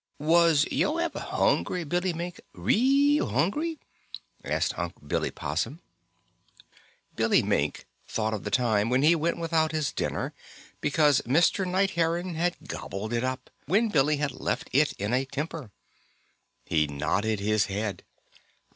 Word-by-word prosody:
Was 160 -1 +4
yo' - - +1
ever - - -2
hungry, 170 - 0
Billy 175 +4 0
Mink 170 +1 -6
real 275 - +3
hungry?" 310 - 0 0.7
asked - - -1
Unc' - - -6
Billy - - 0
Possum. - - -3 1.4
Billy - - +3
Mink - - -1 0.2
thought 110 -1 -1
of 105 - -4
the 105 - -3
time 110 -1 +2
when 125 +2 +2
he 160 +3 +6
went 165 +1 0
without 165 -1 +1
his 155 -3 0
dinner - - -3 0.5
because 145 -2 +3
Mr. 170 +8 +2
Night 190 +2 +1
Heron 170 +1 0
had 175 +2 -2
gobbled 105 +4 -5
it 120 0 0
up, 130 0 -4 0.2
when 215 +8 +3
Billy 150 -3 +2
had 145 -1 -1
left - - -3
it 145 +3 +3
in 105 +4 -3
a 130 +1 +2
temper. 150 -1 -5 1.0
He 75 -2 +1
nodded 90 +10 -1
his 105 +1 +1
head. 100 0 -3
150 Hz, 140 wpm, -27 LUFS, 110-175 Hz, 1.4 s, he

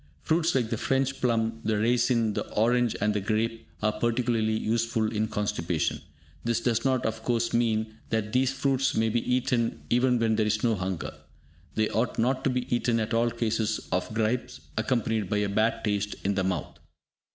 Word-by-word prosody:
Fruits 165 0 +2
like 120 -4 +1
the 115 - -1
French 135 0 0
plum, 115 -2 +1
the 110 -1 +1
raisin, 115 0 +2
the - - -4
orange 120 +2 +2
and 105 +1 +1
the 105 - -1
grape, 110 +2 -1 0.2
are 110 - +3
particularly 115 0 0
useful 115 -1 0
in 110 0 0
constipation. 105 -6 -1 0.4
This 115 -1 +1
does 115 -1 0
not, 130 -2 +1
of 110 0 -2
course, 115 0 0
mean 110 -2 0
that 110 -2 -1
these 130 +1 +3
fruits 135 -1 +1
may 110 0 +2
be 115 +1 +1
eaten 125 -2 0
even 125 +1 +3
where 115 -1 +1
there 110 -1 +2
is 105 0 0
no 115 -2 +3
hunger. 95 -3 -3 0.6
They 110 0 +2
ought 115 +3 -1
not 130 +3 +1
to - - +4
be 125 -1 -1
eaten 120 -1 +1
at 110 +1 -2
all 115 +1 +3
in 115 - -11
cases 110 -2 0
of - - -1
gripes 110 +3 -1
accompanied 110 -3 0
by 105 - +1
a 105 -1 0
bad 110 +3 +1
taste 105 -1 -1
in 100 - +1
the 95 -1 0
mouth. 90 -5 -3
115 Hz, 190 wpm, -27 LUFS, 110-120 Hz, 0.6 s, to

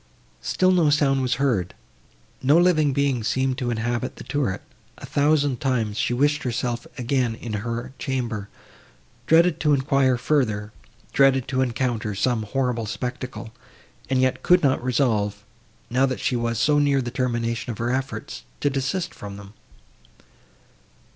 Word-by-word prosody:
Still 185 0 +2
no 170 -5 +4
sound 140 -2 +3
was 130 -1 +1
heard, 120 -10 0 0.7
no 140 +5 +4
living 165 -5 +4
being 135 -3 0
seemed 130 +3 0
to 125 -3 -1
inhabit 120 +1 -2
the - - -10
turret; 135 -10 -2 0.3
a - - -9
thousand 145 -2 +1
times 115 -6 0
she - - 0
wished 145 +4 +2
herself 120 -1 -2
again 125 -2 0
in 115 -1 -7
her 120 +3 -4
chamber; 120 -7 -3 0.8
dreaded 165 +1 +4
to 150 -2 +3
enquire 135 -2 +2
farther—dreaded 130 +1 0
to 130 0 +1
encounter 120 -4 -1
some 115 +3 +1
horrible 120 +1 -1
spectacle, 125 0 -5 0.6
and 130 -1 +2
yet 130 0 +1
could 180 -1 +4
not 135 -3 +2
resolve, 110 -5 0 0.5
now 130 +2 +3
that 130 - -3
she 125 - 0
was 115 -1 -1
so 145 +6 +3
near 140 -1 +3
the 120 -2 -3
termination 115 -2 -2
of 110 - -7
her 120 +1 -1
efforts, 130 - -4 0.2
to 145 - +1
desist 135 +7 -2
from 100 -1 -8
them. 100 0 -12
130 Hz, 145 wpm, -24 LUFS, 115-140 Hz, 0.8 s, no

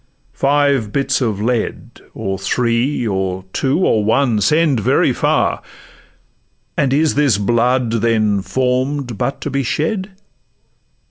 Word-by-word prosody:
five 140 -5 +1
bits 140 +2 0
of 110 -5 -1
lead, 115 +1 -3
Or 95 0 -3
three, 120 +6 0
or 95 -2 -2
two, 140 +7 +1
or 110 - +2
one, 115 0 +1
send 150 +3 +2
very 105 - +2
far! - - 0 1.1
And 135 -2 +1
is 150 +3 +2
this 140 -7 +2
blood, 120 +3 +1
then, 110 -3 +1
form'd 130 +2 -1
but 130 +2 -2
to 145 - -4
be 140 +1 0
shed? 185 - -2
125 Hz, 125 wpm, -17 LUFS, 110-140 Hz, 1.1 s, or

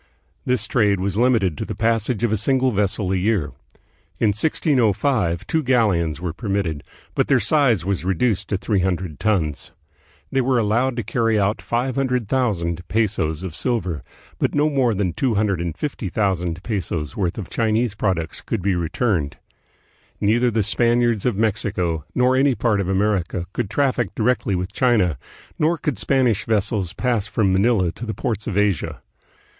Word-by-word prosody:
This 125 -3 +1
trade 105 -4 +2
was 95 0 -2
limited 110 -7 +2
to - - -1
the - - -5
passage 115 0 0
of 120 - +2
a - - +3
single 130 +4 +2
vessel 100 -2 0
a - - +1
year. 95 -5 0 0.7
In 110 - +2
1605 110 - +1
two 160 - 0
galleons 105 - +1
were 85 -2 -3
permitted, 95 -6 -2 0.3
but - - +1
their - - +4
size 125 - +3
was 100 -2 -1
reduced 95 +4 0
to 100 - 0
three 100 +1 0
hundred 90 -5 -2
tons. 85 -9 -1 0.6
They 135 - +2
were 130 0 +1
allowed 120 +4 +1
to 120 - -2
carry 115 +1 +1
out 100 +2 0
500,000 120 -8 -1
pesos 95 -5 0
of 95 -4 -5
silver, 95 - -2 0.4
but - - 0
no 150 +1 +2
more 130 -6 +2
than 95 -3 -1
250,000 95 - -1
pesos' 85 - -3
worth 90 -4 -1
of 105 - -6
Chinese 115 0 +1
products 90 -7 -2
could 105 -6 -3
be 100 0 +2
returned. 85 - -1 0.8
Neither 120 +4 +3
the 110 -2 +1
Spaniards 120 +1 +2
of 120 - +1
Mexico 95 -7 -1
nor 125 +1 +3
any 135 0 +3
part 105 -2 +1
of 95 - -3
America 95 -3 0
could 120 -5 -2
traffic 125 -4 0
directly 110 -3 +1
with 90 +2 -3
China, 105 - +2 0.4
nor 165 +3 +2
could 150 -3 -2
Spanish 125 -7 +1
vessels 105 -4 0
pass 120 -5 0
from 100 -3 +1
Manila 95 -3 +2
to 120 - -8
the 110 - -3
ports 110 -2 -3
of 105 -4 -2
Asia. 105 -5 0
105 Hz, 160 wpm, -21 LUFS, 95-120 Hz, 0.8 s, their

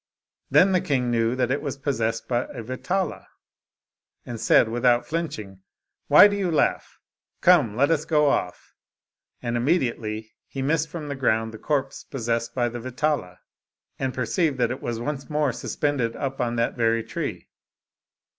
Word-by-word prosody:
Then 190 +1 +5
the 185 -1 +3
king 125 -4 0
knew 115 +1 +1
that 125 -1 0
it 140 - 0
was 140 -3 -4
possessed 115 -5 -2
by 120 0 0
a 120 -4 -8
Vetala, 175 - -3 1.0
and 120 -2 -6
said 115 - +5
without 120 +1 +2
flinching^ 110 - -4 0.2
" - - -56
Why 205 - +9
do 205 - -2
you 195 -3 -1
laugh? 160 - 0 0.4
Come, 150 - +5
let 140 +6 +3
us 155 -2 +1
go 150 -2 +2
off." 140 - -2 0.7
And 120 0 -2
immedi 130 0 +1
ately 110 0 -6 0.2
he 135 - -5
missed 155 +2 +1
from 155 -1 -6
the 140 - -4
ground 110 -4 0
the 110 - -9
corpse 140 -3 -2
possessed 115 -3 -3
by 120 -2 +1
the 120 0 -5
Vetala, 130 -6 -2 0.6
and 135 -1 -1
perceived 135 +4 0
that 120 -2 +1
it 130 - -5
was 115 -1 -3
once 140 +4 -4
more 150 -4 +1
suspended 125 -1 -1
on 130 -4 -2
that 115 0 0
very 115 -1 +1
tree. - - -5
130 Hz, 165 wpm, -24 LUFS, 115-150 Hz, 1.0 s, Why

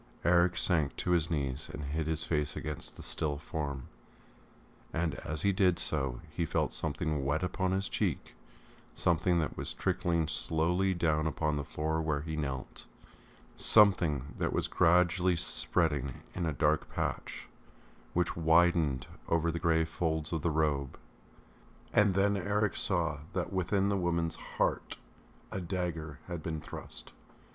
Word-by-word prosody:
Eric 85 +1 +4
sank 80 -6 +2
to 90 - -2
his 85 -2 +3
knees 70 -3 -2
and 75 - -6
hid 75 +2 -2
his 80 0 -1
face 75 -2 0
against 75 -2 -4
the - - -7
still 75 -3 0
form, 70 -3 -4 1.1
and 85 -1 -1
as 75 +1 -4
he 100 - +4
did 90 -2 +3
so 65 -5 0
he 85 - -2
felt 80 - 0
something 75 -1 -1
wet 75 +5 0
upon 95 0 0
his 95 +1 0
cheek, - - -2 0.6
something 85 +1 +2
that 80 -2 -1
was - - -3
trickling 85 -2 0
slowly 85 +4 +1
down 80 -3 +1
upon 75 0 0
the 70 - -2
floor 80 +3 -2
where 75 -2 0
he 80 +1 -4
knelt, 70 -4 -5 0.7
something 85 - +4
that - - 0
was - - 0
gradually 90 +1 +3
spreading 70 -2 0
in 85 -3 -2
a - - +1
dark 75 +1 +1
patch, - - -3 0.7
which 90 0 +1
widened 80 -4 +3 0.2
over 85 0 +2
the 85 - -3
grey 80 -1 +3
folds 80 -1 -2
of 80 - -1
the 85 - +1
robe. 75 -4 0 1.0
And 105 -3 +4
then 100 +1 +3
Eric 105 +2 0
saw 85 -6 +1
that 90 +1 -2
within 95 +2 +1
the 100 - +1
woman's 85 -2 0 0.2
heart - - 0 0.5
a 95 - -3
dagger 85 -4 -3
had 85 -3 -5
been 80 0 -3
thrust.... - - -7
80 Hz, 150 wpm, -31 LUFS, 75-90 Hz, 1.1 s, Eric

